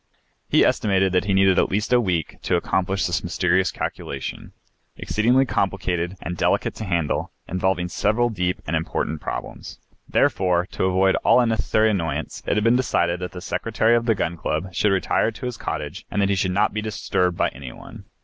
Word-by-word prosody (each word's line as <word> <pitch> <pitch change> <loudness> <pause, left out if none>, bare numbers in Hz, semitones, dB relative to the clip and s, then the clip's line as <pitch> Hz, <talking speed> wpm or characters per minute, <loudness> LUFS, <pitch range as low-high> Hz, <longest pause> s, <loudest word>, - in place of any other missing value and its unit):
He - - +5
estimated 95 -2 +2
that 90 0 +1
he 100 - +1
needed 95 -1 +4
at - - +2
least 105 +5 -1
a 120 - +5
week 90 -7 -2
to - - 0
accomplish 95 +1 0
this 85 -3 -1
mysterious 90 +1 +1
calculation, - - -5 0.5
exceedingly 125 +5 +2
complicated 95 -4 -1
and 90 - -4
delicate - - +1
to 110 - -5
handle, 85 -5 -1 0.2
involving 90 0 0
several 110 +6 +1
deep 90 -3 -2
and 80 - -1
important 80 -1 -2
problems. - - -6 0.3
Therefore, 90 -2 +2
to - - -1
avoid 95 +1 +3
all - - +4
unnecessary 110 -2 +2
annoyance, 80 -6 -3
it - - +1
had 105 - +1
been 115 +2 +4
decided 85 -9 +1
that 90 0 -5
the 90 - -7
Secretary 115 +4 +1
of 120 0 0
the 115 - +3
Gun 85 -3 -2
Club 95 +3 -3
should 105 +3 +2
retire 95 +3 +1
to 125 - -8
his 125 -1 -3
cottage - - -5
and - - -2
that 100 -1 +2
he 100 - +2
should 95 0 0
not 100 +3 +1
be 105 - -2
disturbed 90 -4 -1
by - - +2
any 65 -1 -9
one. - - -12
95 Hz, 190 wpm, -23 LUFS, 90-105 Hz, 0.5 s, He